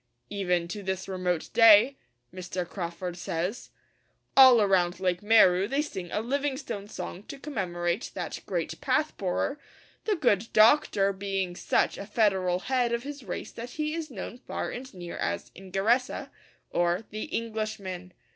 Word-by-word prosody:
'Even 180 -4 0
to 205 +4 -5
this 190 -1 -3
remote 180 -3 -2
day,' 225 +3 +7 0.4
Mr. 180 -1 -4
Crawford 175 -1 -5
says, 180 +5 -3 0.7
'all 260 -3 +9
around 190 -4 +2
Lake 180 -2 0
Mweru 200 -3 +5
they 280 +3 +1
sing 190 - -6
a 210 - 0
"Livingstone" 265 -4 -3
song 180 -2 -6
to - - -8
commemorate 180 - -2
that - - -4
great - - -3
"path 310 0 +1
borer," 200 +9 -1 0.5
the 430 - +2
good 230 - +2
Doctor 215 -4 +5
being 195 -2 -2
such - - +1
a 200 - -7
federal 190 -5 +1
head 250 -1 +1
of 235 0 -1
his 285 -1 -7
race 180 -5 -5
that 235 +1 -7
he 305 0 -1
is 325 -2 -4
known 240 +1 -7
far - - -4
and 260 +2 -7
near 175 -1 -7
as 85 0 -3
Ingeresa, 195 +7 0 0.4
or 175 +3 +1
"The 215 0 -4
Englishman." 215 -5 -4
200 Hz, 150 wpm, -28 LUFS, 180-240 Hz, 0.7 s, all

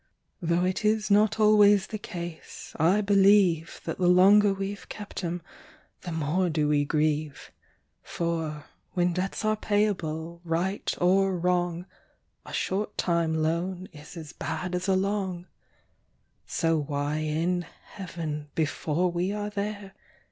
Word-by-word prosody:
Though 170 +1 +1
it 185 +3 -1
is 215 0 +1
not 215 +2 +4
always 205 -2 +6
the 215 - -6
case, 175 -5 -8
I 180 +7 +4
believe, 195 -4 +3
That - - -4
the 180 - +2
longer 200 +3 +6
we've 195 +1 -5
kept 205 -2 -7
'em, 170 0 -3 0.6
the 175 - -6
more 165 +3 0
do 155 -2 +1
we 145 -1 +2
grieve: 150 -1 -1 0.5
For, 160 -3 -3 0.3
when 175 -1 +1
debts 190 +4 -2
are 215 0 +2
payable, 170 -6 -1
right 175 +4 -1
or 190 +1 +3
wrong, 175 0 0 0.6
A - - -8
short 205 +2 -2
time 170 -2 +1
loan 175 +4 -2
is 150 +3 -12
as 155 -3 -8
bad 160 +5 -4
as 180 +2 -2
a 190 - +3
long 190 -2 -1 1.0
So 165 -1 +1
why 145 0 -2
in 165 +3 -1 0.2
Heaven 160 -6 -6
(before 160 +3 0
we 175 +3 -1
are 210 0 -3
there!) 205 -1 -4
180 Hz, 135 wpm, -27 LUFS, 160-195 Hz, 1.0 s, always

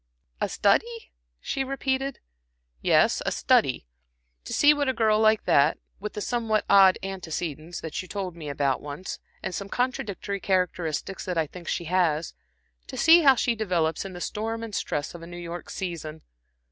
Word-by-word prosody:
"A - - +3
a - - -5
study," 455 - +1 0.3
she 270 - -2
repeated. 270 0 -2 0.6
"Yes, - - +3
a - - -1
study - - +2 0.6
to - - -7
see 295 +1 +6
what 290 -2 0
a - - +1
girl 220 -3 +3
like 220 0 +3
that, 145 +2 +4 0.2
with 210 +2 -5
the 210 - -5
somewhat 225 -2 0
odd 195 -2 +7
antecedents 170 -3 -5
that 160 -2 -4
you 185 - -11
told 190 -4 -4
me 155 -3 -7
about 140 -1 0
once, 150 +5 -6 0.2
and - - -3
some 200 +1 -5
contradictory 205 -5 -2
characteristics 180 -2 -1
that 180 -2 -2
I 160 - +2
think 170 +3 -12
she - - -1
has 170 -2 +1 0.5
to 260 - -7
see 330 +6 +7
how 275 -4 +7
she 240 0 +1
develops 175 -8 0
in 195 -1 -7
the 175 - -8
storm 225 +4 -3
and 225 -2 -7
stress 150 -5 -2
of 170 - -9
a 165 - -9
New 175 0 -9
York 175 0 -7
season. 160 -4 -5
190 Hz, 180 wpm, -26 LUFS, 165-225 Hz, 0.6 s, odd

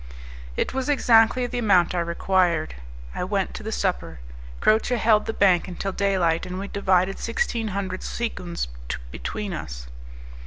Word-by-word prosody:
It - - -1
was 265 +1 -2
exactly 245 -3 +4
the 245 0 -3
amount 190 -7 +4
I 180 - 0
required. 170 -1 +1 0.4
I - - -3
went 195 +1 -1
to - - -7
the 220 +1 -5
supper; 180 - -2 0.4
Croce 220 +3 +3
held 215 -1 +3
the - - 0
bank 190 -5 +3
until 190 +2 -4
daylight, 185 -4 +1
and 180 0 -5
we 195 +1 -4
divided 190 -1 +1
sixteen 230 - -1
hundred 190 -2 -3
sequins 180 - -3 0.4
between 195 - -4
us. - - -6
195 Hz, 150 wpm, -24 LUFS, 180-220 Hz, 0.4 s, exactly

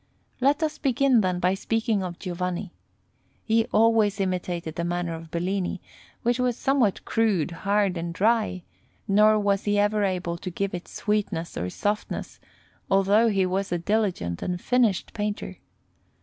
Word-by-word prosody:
Let 280 +5 +2
us 310 -1 -2
begin, 265 -2 +3
then, 185 -2 0
by 180 +1 +2
speaking 225 +1 0
of 180 -2 -5
Giovanni. 180 0 -4 0.7
He 225 0 +2
always 220 -3 +3
imitated 180 -3 -2
the 170 - -3
manner 175 0 -2
of 165 0 -8
Bellini, 180 +3 -2 0.4
which 240 +1 +1
was 250 -1 +1
somewhat 265 -8 +1
crude, 205 -9 +1
hard, 200 +1 0
and 170 0 -3
dry; 210 0 +1 0.4
nor 215 +2 +5
was 200 -1 +1
he 205 0 +2
ever 205 +1 +2
able 180 -3 -1
to 185 - -5
give 195 +2 -3
it 175 -1 -5
sweetness 210 -5 -2
or 90 +2 -2
softness, 205 - -3 0.5
although 200 +4 +4
he 195 -4 +2
was 190 +1 -2
a 175 - +1
diligent 175 - -1
and 180 -1 -2
finished 235 -3 +1
painter. 210 -1 -4
200 Hz, 150 wpm, -25 LUFS, 180-220 Hz, 0.7 s, nor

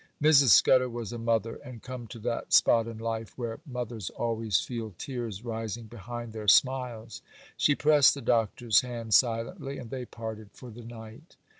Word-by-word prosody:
Mrs. 150 -2 +5
Scudder 125 +5 +6
was 120 -1 -6
a 120 - -5
mother, 115 -1 -1
and 125 -3 -12
come 125 -2 -7
to 110 - -10
that 115 +1 -3
spot 115 -1 +5
in 115 -1 -7
life 115 -1 -5
where 120 0 -5
mothers 120 - -5
always 115 -5 -1
feel 115 -5 -6
tears 120 -5 -6
rising 115 0 -5
behind 120 +1 -8
their 110 -1 -7
smiles. 120 -1 +2 0.3
She 145 - +3
pressed 150 -2 +5
the 140 - -7
Doctor's 115 -1 +2
hand, 120 -3 -5
silently, 130 - +1
and 120 -3 -9
they 130 -2 -5
parted 110 -3 -8
for 125 -2 -11
the 120 +2 -11
night. 115 +6 -12
115 Hz, 170 wpm, -28 LUFS, 110-125 Hz, 0.3 s, Scudder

